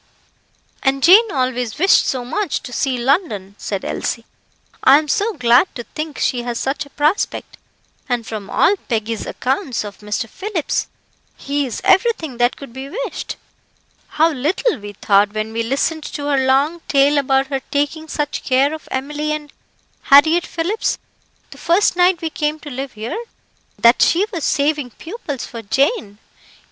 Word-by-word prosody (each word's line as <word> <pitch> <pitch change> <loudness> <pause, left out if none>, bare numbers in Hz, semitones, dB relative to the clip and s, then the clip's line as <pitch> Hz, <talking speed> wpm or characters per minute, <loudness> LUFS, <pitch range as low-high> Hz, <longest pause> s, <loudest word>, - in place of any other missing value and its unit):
"And 270 0 +1
Jane 410 +5 +7
always 255 -3 -1
wished 375 +5 +4
so 255 -2 -2
much 400 +7 -2
to 250 -2 -8
see 265 -1 0
London," 240 - 0
said 195 -2 -4
Elsie. 230 -1 -3 0.6
"I 270 +2 +8
am 305 0 -1
so 410 +10 0
glad 250 +1 +4
to 240 - -5
think 305 +3 -6
she 245 - 0
has 240 -1 -4
such 285 +4 -2
a - - -19
prospect, 300 +7 -1 0.5
and 240 -2 -1
from 215 -3 -6
all 395 - +3
Peggy's 225 -1 -2
accounts 265 - -2
of 205 -1 -9
Mr. 210 +3 -3
Phillips, 380 - -2 0.5
he 285 0 -2
is 235 - -5
everything 370 - +2
that 245 +1 +2
could 275 -5 -11
be 265 +2 -7
wished. - - -5 0.8
How 320 +2 +5
little 310 - 0
we 205 0 -8
thought 205 +1 +2
when 215 +1 -3
we 230 - -1
listened 280 +6 -1
to 290 - -5
her 270 -2 +2
long 290 +6 +2
tale 285 +1 +4
about 270 0 +2
her 270 - 0
taking 290 +2 -1
such 295 -1 -3
care 270 +3 +2
of 315 - -8
Emily 295 +3 -2
and 300 -1 -6 0.6
Harriett 315 +5 +6
Phillips, 355 +7 -1 0.5
the - - -12
first 350 +3 +2
night 360 0 +3
we 320 - -2
came 300 0 -1
to 290 - -8
live 265 +1 -5
here, 225 - -5 0.5
that 235 +1 +5
she 365 +5 +4
was 335 -4 -3
saving 290 -2 +1
pupils 295 - -6
for 230 - -8
Jane. 270 - 0
280 Hz, 165 wpm, -19 LUFS, 245-320 Hz, 0.8 s, I